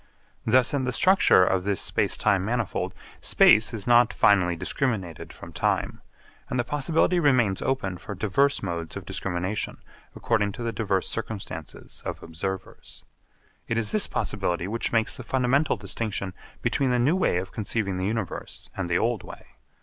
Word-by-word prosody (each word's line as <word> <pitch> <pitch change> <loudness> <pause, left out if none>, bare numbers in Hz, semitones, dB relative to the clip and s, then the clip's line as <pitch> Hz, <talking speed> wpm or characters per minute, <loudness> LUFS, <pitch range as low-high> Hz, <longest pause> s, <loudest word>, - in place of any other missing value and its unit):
Thus 125 +3 +4
in 140 -2 0
the 125 - 0
structure 185 - +5
of 90 0 +1
this 100 -1 0
space - - +1
time 95 -2 +2
manifold 115 0 -2 0.2
space 110 +1 +5
is 110 -4 -3
not 120 -1 +5
finally 90 -4 +4
discriminated 95 - -2
from - - -12
time, - - -1 0.5
and 125 - -2
the 120 - +2
possibility 160 +6 +1
remains 125 - +2
open 100 -9 -2
for 100 - -7
diverse 110 +9 +1
modes 85 -2 -4
of 95 - -8
discrimination 95 +1 -3 0.4
according 105 -3 0
to 120 - -7
the 115 - -1
diverse 100 -4 -1
circumstances 110 -3 -6
of - - -6
observers. 95 +4 -6 0.6
It 115 - -1
is 115 -2 0
this 215 - +2
possibility 90 -4 -2
which 115 +3 -2
makes 115 -1 +2
the - - -8
fundamental 135 +4 +1
distinction 100 -1 -2 0.3
between 135 -2 +1
the 125 - +2
new 135 +8 +3
way 185 - +1
of 95 +1 -4
conceiving 105 -3 -2
the 95 +1 -1
universe 110 -3 -5
and 95 -3 -3
the 85 - +2
old 115 -2 0
way. - - -11
110 Hz, 165 wpm, -26 LUFS, 95-125 Hz, 0.6 s, structure